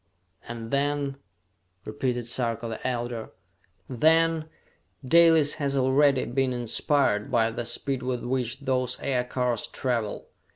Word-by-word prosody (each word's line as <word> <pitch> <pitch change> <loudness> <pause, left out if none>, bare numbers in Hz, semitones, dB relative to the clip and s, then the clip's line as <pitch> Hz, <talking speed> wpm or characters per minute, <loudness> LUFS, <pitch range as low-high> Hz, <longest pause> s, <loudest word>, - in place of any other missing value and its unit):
"And 115 -1 -7
then 140 0 0 0.3
?" 90 0 -44
repeated 120 +2 -2
Sarka 115 -1 -1
the 115 +2 -4
Elder. 120 -2 -3 0.6
"Then, 160 +4 +2 0.6
Dalis 160 0 +5
has 140 -1 0
already 135 +1 +3
been 130 +1 0
inspired 120 -2 0
by 115 -1 +2
the 120 +1 -4
speed 130 +2 -2
with 125 -1 -3
which 125 +1 -2
those 130 -2 -1
aircars 125 -2 -1
travel! 115 -5 -3
125 Hz, 120 wpm, -26 LUFS, 115-140 Hz, 0.6 s, Dalis